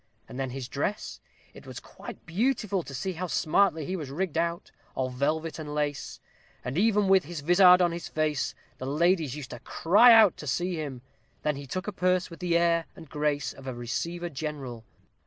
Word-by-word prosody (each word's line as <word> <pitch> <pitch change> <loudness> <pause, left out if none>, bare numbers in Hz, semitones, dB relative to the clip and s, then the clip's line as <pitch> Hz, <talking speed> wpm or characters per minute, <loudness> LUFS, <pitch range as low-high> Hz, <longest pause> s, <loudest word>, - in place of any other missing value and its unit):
And 125 - -8
then 135 -1 -2
his 130 0 -6
dress 145 +11 -3 0.3
it - - -14
was - - -7
quite - - -11
beautiful 205 +1 0
to 140 - -10
see 190 +8 -3
how 180 +2 -4
smartly 160 -1 +2
he 185 - -3
was 155 -7 -5
rigg'd 170 +4 -3
out, 170 +1 -1 0.2
all 130 -1 -1
velvet 155 +5 -1
and 150 -1 -6
lace; 145 -1 -3 0.5
and 125 +2 -3
even 210 +2 +3
with 190 -1 +4
his 165 -1 -6
vizard 180 +3 +6
on 175 - +2
his 170 0 -5
face, 155 -3 -1 0.2
the 130 - -5
ladies 160 -1 +1
used 145 -4 -8
to 120 - -7
cry 205 - +5
out 220 -5 +7
to 150 - -8
see 175 +7 -1
him. 145 -6 -5 0.4
Then 150 -1 +1
he 140 0 -8
took 185 +9 -4
a - - -1
purse 185 -1 0
with 165 - -10
the 175 -2 +1
air 170 -1 +2
and 160 -4 -13
grace 150 -2 -1
of 135 0 -12
a 130 - -4
receiver 170 +9 -3
general. 135 -6 -6
160 Hz, 200 wpm, -27 LUFS, 140-180 Hz, 0.5 s, out